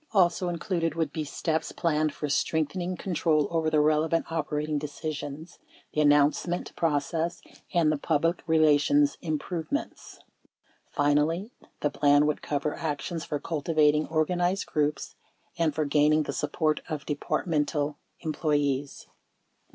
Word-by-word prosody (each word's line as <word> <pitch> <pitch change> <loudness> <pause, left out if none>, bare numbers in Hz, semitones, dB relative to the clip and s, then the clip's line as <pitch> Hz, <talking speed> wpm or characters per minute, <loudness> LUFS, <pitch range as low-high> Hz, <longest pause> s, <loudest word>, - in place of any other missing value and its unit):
Also 180 -2 +3
included 170 -2 -1
would 160 -3 -1
be 155 - -2
steps 160 +2 -2
planned 155 -2 0
for 150 - -4
strengthening 175 +5 -1
control 160 -5 +1
over 165 -1 +1
the 155 -1 +2
relevant 155 +2 +2
operating 150 -1 -1
decisions, 150 +1 -6 0.3
the 150 - +2
announcement 150 +4 +2
process, 165 +2 0 0.3
and 165 -4 +3
the 155 - -1
public 165 +3 +1
relations 160 - +4
improvements. 165 - -4 0.7
Finally, 150 +8 +1 0.3
the 145 - +1
plan 145 0 +4
would 150 0 0
cover 150 0 -2
actions 160 +1 -3
for 145 - -3
cultivating 155 -1 +1
organized 175 +4 0
groups 150 -1 -1 0.4
and 165 -4 0
for 155 - 0
gaining 150 +2 +3
the - - -4
support 155 +1 0
of 155 -3 -4
Departmental 150 -1 -1 0.2
employees. 145 -3 -1
155 Hz, 120 wpm, -27 LUFS, 150-165 Hz, 0.7 s, relations